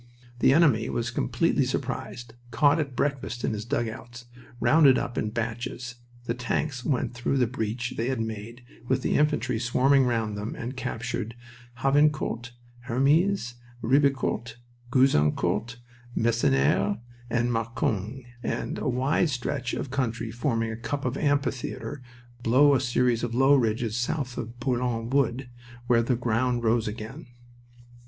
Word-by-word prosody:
The -, -, +5 dB
enemy 140 Hz, -8 st, +4 dB
was 120 Hz, +1 st, -2 dB
completely -, -, +1 dB
surprised, 120 Hz, -1 st, -4 dB, 0.2 s
caught 145 Hz, +7 st, +3 dB
at 140 Hz, -4 st, -3 dB
breakfast 135 Hz, -4 st, -2 dB
in -, -, 0 dB
his 105 Hz, 0 st, -4 dB
dugouts, 120 Hz, -1 st, -4 dB, 0.3 s
rounded 130 Hz, +3 st, +6 dB
up 120 Hz, -, -3 dB
in 110 Hz, -, -1 dB
batches. 120 Hz, +2 st, -4 dB, 0.3 s
The 115 Hz, -, -1 dB
tanks 125 Hz, +2 st, -2 dB
went 130 Hz, -4 st, 0 dB
away -, -, -18 dB
through 125 Hz, +3 st, -1 dB
the 125 Hz, -, +4 dB
breach 115 Hz, 0 st, -3 dB
they 115 Hz, -, -1 dB
had 130 Hz, -3 st, -1 dB
made, 110 Hz, +2 st, -5 dB, 0.2 s
with 130 Hz, 0 st, +1 dB
the -, -, +1 dB
infantry 130 Hz, -6 st, +1 dB
swarming 130 Hz, +3 st, +3 dB
round 115 Hz, -3 st, 0 dB
them, 105 Hz, +2 st, -4 dB
and 125 Hz, +3 st, -5 dB
captured 115 Hz, -2 st, -4 dB, 0.5 s
Havrincourt, 135 Hz, -4 st, +2 dB, 0.4 s
Hermies, 140 Hz, +3 st, +2 dB, 0.3 s
Ribecourt, 135 Hz, -2 st, +1 dB, 0.4 s
Gouzeaucourt, 120 Hz, -, +2 dB, 0.4 s
Masnieres, 100 Hz, -, +2 dB, 0.3 s
and 120 Hz, +1 st, +1 dB
Marcoing, 115 Hz, +1 st, -2 dB, 0.2 s
and -, -, -3 dB
a 140 Hz, -, -1 dB
wide 135 Hz, +6 st, +1 dB
stretch 130 Hz, -1 st, -2 dB
of 130 Hz, -, -4 dB
country 115 Hz, -4 st, -2 dB
forming 115 Hz, -1 st, -1 dB
a -, -, -4 dB
cup 115 Hz, +5 st, -4 dB
or 130 Hz, +2 st, -1 dB
amphitheater 135 Hz, -4 st, -1 dB, 0.4 s
below 130 Hz, +5 st, +5 dB
a 135 Hz, -, +4 dB
series 125 Hz, -2 st, +1 dB
of 115 Hz, -1 st, -2 dB
low 135 Hz, +3 st, +5 dB
ridges 115 Hz, -3 st, +1 dB
south 125 Hz, 0 st, -2 dB
of 120 Hz, 0 st, -7 dB
Bourlon 120 Hz, -2 st, -1 dB
Wood, 130 Hz, -2 st, 0 dB, 0.3 s
where 120 Hz, -1 st, +4 dB
the 120 Hz, +2 st, +1 dB
ground 120 Hz, +1 st, 0 dB
rose 115 Hz, 0 st, +2 dB
again. 115 Hz, +8 st, -7 dB
120 Hz, 140 wpm, -26 LUFS, 115-135 Hz, 0.5 s, rounded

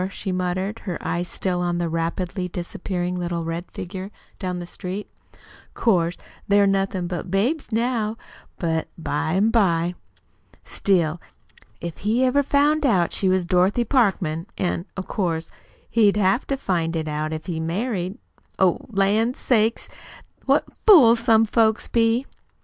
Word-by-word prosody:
she 195 Hz, 0 st, -5 dB
muttered, 185 Hz, +4 st, -2 dB
her 180 Hz, -6 st, -4 dB
eyes 175 Hz, 0 st, -2 dB
still 180 Hz, -1 st, -2 dB
on 175 Hz, -1 st, 0 dB
the 175 Hz, -1 st, -1 dB
rapidly 170 Hz, +3 st, -2 dB
disappearing 180 Hz, +1 st, -4 dB
little 170 Hz, -1 st, -2 dB
red 165 Hz, +2 st, -4 dB
figure 185 Hz, +1 st, -6 dB, 0.3 s
down 185 Hz, -2 st, -3 dB
the 175 Hz, -, -5 dB
street. 190 Hz, +3 st, -6 dB
"Oh, -, -, -31 dB, 0.4 s
'course 175 Hz, -6 st, +2 dB, 0.3 s
they're 200 Hz, 0 st, +5 dB
nothin' 195 Hz, -2 st, 0 dB
but 175 Hz, 0 st, -4 dB
babies 235 Hz, -, 0 dB
now, 225 Hz, -1 st, 0 dB, 0.4 s
but 160 Hz, -2 st, -1 dB
by 160 Hz, -1 st, -2 dB
an' 205 Hz, +4 st, +3 dB
by! 175 Hz, -6 st, +2 dB, 0.7 s
Still, 170 Hz, -4 st, 0 dB, 0.6 s
if 170 Hz, -1 st, -6 dB
he 225 Hz, +5 st, +1 dB
ever 270 Hz, +3 st, +3 dB
found 290 Hz, +2 st, +2 dB
out 190 Hz, -11 st, +2 dB
she 190 Hz, -, +1 dB
was 185 Hz, -1 st, +2 dB
Dorothy 185 Hz, +6 st, +2 dB
Parkman, 190 Hz, -, +1 dB
an' 175 Hz, 0 st, -2 dB
of 190 Hz, -, -4 dB
course 165 Hz, -5 st, -2 dB, 0.4 s
he'd 210 Hz, -3 st, +4 dB
have 195 Hz, +4 st, +2 dB
to 275 Hz, -, -1 dB
find 170 Hz, -8 st, -1 dB
it 160 Hz, -1 st, -2 dB
out 155 Hz, +1 st, -2 dB
if 155 Hz, 0 st, -5 dB
he 170 Hz, -3 st, -3 dB
married 185 Hz, +3 st, -2 dB, 0.4 s
Oh, 185 Hz, -2 st, +3 dB
lan' 215 Hz, +4 st, +2 dB
sakes, 225 Hz, -2 st, +1 dB, 0.6 s
what -, -, +4 dB, 0.2 s
fools 245 Hz, -, +8 dB
some 225 Hz, -1 st, +4 dB
folks 220 Hz, 0 st, +2 dB
be!" 230 Hz, +2 st, +2 dB
190 Hz, 150 wpm, -23 LUFS, 175-225 Hz, 0.7 s, fools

